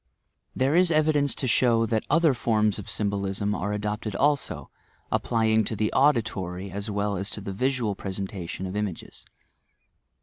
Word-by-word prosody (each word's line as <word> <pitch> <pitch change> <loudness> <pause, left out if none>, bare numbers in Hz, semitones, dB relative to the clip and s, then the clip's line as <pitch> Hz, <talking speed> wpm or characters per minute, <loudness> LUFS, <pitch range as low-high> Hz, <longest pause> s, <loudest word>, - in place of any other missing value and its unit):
There 135 +4 +2
is 180 0 +5
evidaiee 155 -3 +2
to - - -3
akow 115 -2 +3
AaS 110 - 0
oAer 165 -3 +4
forms 110 -3 +1
of 100 - -7
by - - -19
the - - -4
■ - - +2
SYMBOLISM 100 -1 -1
bolism - - 0
are 105 - -2
adopted 105 0 -3
also, 135 - 0 0.2
— - - -37
applying 110 -1 +2
to 110 - -2
the 105 +1 -1
auditory 100 -9 +1
ae 100 +2 -4
well 100 0 -1
as 95 +3 -2
to - - -5
the 100 -1 -5
visual 125 -1 0
presentation 95 -2 -5
of 95 +1 -5
images. 105 -5 -5
105 Hz, 180 wpm, -26 LUFS, 100-125 Hz, 0.2 s, is